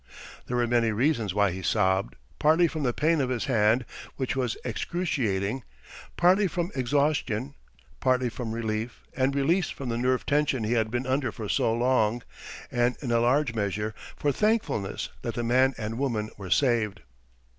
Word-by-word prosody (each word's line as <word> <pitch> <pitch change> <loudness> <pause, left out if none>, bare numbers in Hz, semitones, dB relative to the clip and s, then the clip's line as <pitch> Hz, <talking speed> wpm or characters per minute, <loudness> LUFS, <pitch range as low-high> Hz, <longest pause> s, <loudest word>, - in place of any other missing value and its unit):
There 125 - -1
were 120 - +2
many 120 -1 +2
reasons 115 - 0
why 100 -2 +3
he 95 +2 -5
sobbed—partly 95 - +1
from 155 -1 -4
the 125 -3 +1
pain 155 +4 +2
of 130 - 0
his 125 -3 -1
hand, 115 -1 +3 0.3
which 130 -2 -2
was 125 -4 -1
excruciating; 125 - -1 0.6
partly 185 +3 +4
from 175 +2 -2
exhaustion; 140 -2 0 0.5
partly 130 -1 +2
from 115 0 -5
relief 110 0 -3
and 135 +1 +1
release 160 +6 +2
from 135 -3 -6
the 115 0 -1
nerve 130 +1 +1
tension 140 -4 +1
he 110 +2 0
had 110 -2 +1
been 120 +3 -2
under 130 0 0
for 110 -3 -6
so 110 - +1
long; 120 -1 +1 0.5
and 120 0 +1
in 125 - -2
a 115 - +3
large 125 +2 +2
measure 105 0 -2 0.2
for 145 - 0
thankfulness 165 - 0
that 115 - -4
the 120 - -2
man 130 +3 +3
and 115 +1 -4
woman 110 -6 -1
were 95 -2 -8
saved. 115 -6 +2
120 Hz, 165 wpm, -27 LUFS, 110-140 Hz, 0.6 s, partly